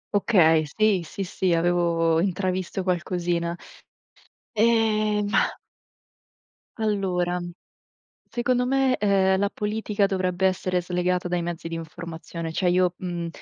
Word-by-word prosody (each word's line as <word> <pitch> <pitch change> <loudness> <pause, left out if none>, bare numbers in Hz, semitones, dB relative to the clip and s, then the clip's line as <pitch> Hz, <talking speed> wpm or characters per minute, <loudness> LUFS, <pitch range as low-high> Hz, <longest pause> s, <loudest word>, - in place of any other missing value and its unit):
Okay, 165 -7 +4
sì, 215 -4 +3
sì, 195 +4 -5
sì. 185 -1 0
Avevo 165 -1 +2
intravisto 185 0 -1
qualcosina. 175 -1 -1 0.9
Ehm, 215 -2 +2
mah - - +1 1.2
Allora, 185 -5 0 0.9
secondo 250 +1 0
me, 265 0 +2
ehm, 190 -2 +3
la 200 +1 +1
politica 210 -1 0
dovrebbe 185 -1 0
essere 185 -1 -1
slegata 180 0 -1
dai 175 -1 -1
mezzi 170 -1 -5
di 165 - -5
informazione. 165 0 -7
Cioè 180 +2 +1
io, 180 0 +2
mhmm, 175 -2 -4
185 Hz, 110 wpm, -25 LUFS, 175-205 Hz, 1.2 s, Okay